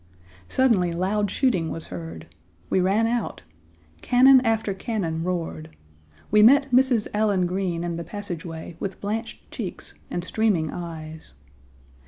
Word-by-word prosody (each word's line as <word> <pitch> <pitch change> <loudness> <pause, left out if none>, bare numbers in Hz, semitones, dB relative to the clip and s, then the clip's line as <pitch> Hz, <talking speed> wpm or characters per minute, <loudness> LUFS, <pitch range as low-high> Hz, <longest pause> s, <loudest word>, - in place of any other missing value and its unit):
Suddenly 205 -10 +3
loud 200 +4 0
shooting 185 - +1
was 165 - -6
heard. 80 -2 -7 0.5
We - - +3
ran 195 +5 +2
out. 230 - -2 0.6
Cannon 260 +1 +6
after 220 -3 0
cannon 190 -6 -3
roared. 165 - -3 0.6
We 210 +1 +6
met 275 +4 +6
Mrs. 250 -3 +3
Allen 205 -3 +2
Green 180 -2 -2
in 170 -1 -3
the 170 - -4
passageway 170 -3 -7
with 195 -2 -5
blanched 215 +3 -5
cheeks - - -6 0.2
and 175 - -3
streaming 185 -6 0
eyes. 160 - -8
190 Hz, 130 wpm, -24 LUFS, 165-220 Hz, 0.6 s, Cannon